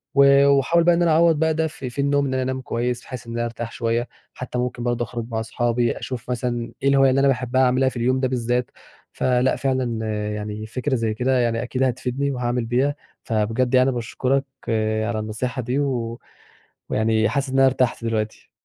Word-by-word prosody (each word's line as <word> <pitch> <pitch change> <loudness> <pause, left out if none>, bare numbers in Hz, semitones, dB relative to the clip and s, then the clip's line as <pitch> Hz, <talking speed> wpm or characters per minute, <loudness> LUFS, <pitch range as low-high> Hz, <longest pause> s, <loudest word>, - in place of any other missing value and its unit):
و 140 0 +6
وأحاول 140 +5 +4
بقى 175 0 +5
إن 175 - 0
أنا 170 -2 +3
أعوّض 165 0 +5
بقى 160 0 +2
ده 160 0 0
في 135 -4 -7
في 130 +3 -3
النوم 140 0 +2
إن 130 - -2
أنام 130 0 -1
كويس، 120 0 -2
بحيث 125 -2 -8
إن 115 - -6
أنا 120 0 -1
أرتاح 115 0 -5
شوية، 115 +1 -1 0.3
حتى 125 0 -6
ممكن 125 -1 -2
برضه 120 -1 0
أخرج 120 0 -5
مع 110 -2 -2
أصحابي 120 +1 0
أشوف 125 -2 -6
مثلًا 120 -1 -2
إيه 140 - +4
الهواية 135 -1 +5
اللي 135 +1 +2
أنا 140 - +4
باحبها 130 -1 +1
أعملها 130 +1 +3
في 130 - -13
اليوم 130 +2 +1
ده 130 - +1
بالذات، 125 -1 -1 0.4
فلأ، 125 0 +1
فعلًا 125 -4 -1 0.3
يعني 105 +1 -5
فكرة 130 +4 -2
زي 115 -2 0
كده 125 +3 +1
يعني 115 -1 0
أكيد 130 +2 -1
هتفيدني، 130 +2 -1
وهاعمل 125 -2 -1
بيها 130 +5 +1 0.3
فبجد 115 +4 0
يعني 130 +1 +5
باشكرك 130 +3 -1 0.6
على 110 -1 -2
النصيحة 120 +4 -3
دي، 125 +4 -1
و 120 -5 -2 0.7
ويعني 110 0 +2
حاسس 140 -1 -1
إن 130 - -5
أنا 135 - +6
ارتحت 125 -3 +1
دلوقتي. 110 -1 -3
125 Hz, 195 wpm, -22 LUFS, 115-135 Hz, 0.7 s, و